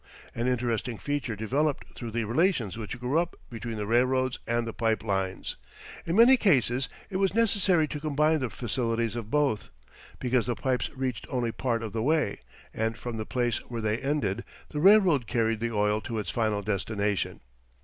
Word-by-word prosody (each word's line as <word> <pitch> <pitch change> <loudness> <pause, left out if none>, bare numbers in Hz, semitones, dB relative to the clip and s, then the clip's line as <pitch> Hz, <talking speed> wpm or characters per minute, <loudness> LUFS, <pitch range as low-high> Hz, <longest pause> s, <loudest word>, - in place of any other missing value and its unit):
An 115 +2 -1
interesting 120 -2 -1
feature 145 -4 -2
developed 135 +8 -1
through 120 - -6
the 115 +1 -1
relations 120 - +1
which 115 +1 -6
grew 125 +6 +1
up 175 0 -2 0.2
between 115 0 -5
the 105 - -2
railroads 130 +3 +2
and 115 0 +1
the 115 - -5
pipe 110 -1 0
lines. 95 -3 -2 0.5
In 165 - 0
many 240 +4 +8
cases 130 - +2 0.2
it 185 - -1
was 195 +1 +1
necessary 195 -8 +3
to 150 - -4
combine 155 +1 +2
the 130 -3 -2
facilities 115 -1 -1
of 115 -3 -5
both, 140 -6 +1 0.5
because 125 -2 +1
the 120 - 0
pipes 130 0 -1
reached 130 -3 -3
only 120 -3 -1
part 115 -1 -1
of 110 - -5
the 115 - -1
way, 150 -4 +1 0.3
and 110 +1 -1
from 120 -1 -5
the 110 - -4
place 120 -3 0
where 120 -1 -4
they 110 +1 0
ended 130 -7 -1 0.3
the 150 - -3
railroad 180 - +5
carried 115 0 +1
the 115 +1 -1
oil 105 0 +1
to 115 - -4
its 105 - -3
final 110 -3 0
destination. 100 -1 -1
120 Hz, 180 wpm, -28 LUFS, 110-145 Hz, 0.5 s, many